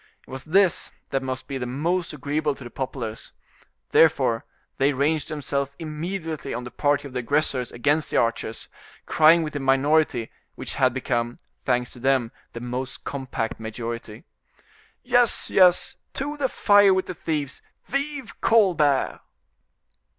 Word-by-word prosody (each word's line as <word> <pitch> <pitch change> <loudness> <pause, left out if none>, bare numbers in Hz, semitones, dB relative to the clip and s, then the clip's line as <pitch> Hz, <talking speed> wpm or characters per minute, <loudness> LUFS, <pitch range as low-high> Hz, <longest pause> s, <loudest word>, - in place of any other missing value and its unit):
It - - -16
was 130 0 -7
this 185 +2 +3 0.2
that 135 - 0
must 130 -1 -5
be 135 -2 -4
most 160 +8 -1
agreeable 150 +1 -1
to 130 - -11
the 120 - -9
populace: 120 -4 -5 0.6
therefore, 130 -8 +4 0.3
they 140 +2 +3
ranged 145 +3 0
themselves 140 -2 -2
immediately 160 -2 -4
on 120 - -4
the 125 - -8
party 145 -1 +1
of 130 - -13
the 125 - -1
aggressors 130 -1 0
against 145 +5 +1
the - - 0
archers, 115 -1 -1 0.4
crying 160 +2 +5
with 155 - -5
the 145 - -2
minority, 135 -2 +2 0.2
which - - -5
had 130 -2 +3
become, 120 -2 -2 0.3
thanks 125 -1 +1
to 125 - -10
them, 130 -2 +1 0.2
the 115 - -6
most 125 +2 -5
compact 130 -5 -4
majority: 115 0 -6 0.8
"Yes, 245 -2 +2
yes: 185 +8 +4 0.2
to 290 +2 -2
the 280 -3 0
fire 205 -2 +5
with 190 - 0
the - - -5
thieves! 150 -5 -3 0.2
Vive 280 -2 -4
Colbert!" 175 -11 +3
140 Hz, 145 wpm, -24 LUFS, 125-165 Hz, 0.8 s, crying